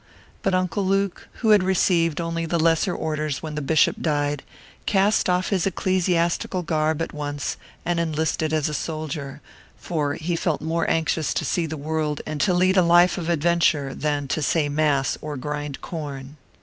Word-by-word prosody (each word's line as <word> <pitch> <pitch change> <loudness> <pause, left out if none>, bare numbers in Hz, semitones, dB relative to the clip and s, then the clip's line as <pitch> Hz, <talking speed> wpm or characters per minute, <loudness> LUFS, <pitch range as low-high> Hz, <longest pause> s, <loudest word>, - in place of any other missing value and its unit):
But 195 -1 +1
Uncle 185 +2 0
Luke, 195 0 0
who 220 -3 +4
had 210 -2 +7
received 175 -3 +2
only 165 0 -2
the 170 - 0
lesser 165 +3 +2
orders 155 -2 -2
when 155 -1 -5
the 150 - -3
bishop 155 +3 +3
died, 145 -2 0 0.5
cast 200 -1 +3
off 180 +1 +1
his 195 -3 +1
ecclesiastical 180 -1 0
garb 160 -1 0
at - - -6
once 145 -1 -3 0.3
and 175 0 0
enlisted 160 -1 0
as 155 -2 +1
a 150 - -3
soldier; 150 -2 -4 0.4
for 150 -4 -2
he 170 +2 -2
felt 165 -2 0
more 165 +2 -1
anxious 160 -2 0
to - - -1
see 170 -2 0
the 155 0 -5
world 150 0 -2
and 155 -1 -3
to 195 - +3
lead 185 +2 +3
a - - +7
life 175 +2 +5
of 170 -1 -4
adventure 165 -4 +2
than 145 -1 -1
to 155 - -1
say 150 0 +1
mass 145 -2 +1
or 150 -2 -5
grind 145 +1 -4
corn. 145 -4 -6
160 Hz, 175 wpm, -23 LUFS, 150-175 Hz, 0.5 s, had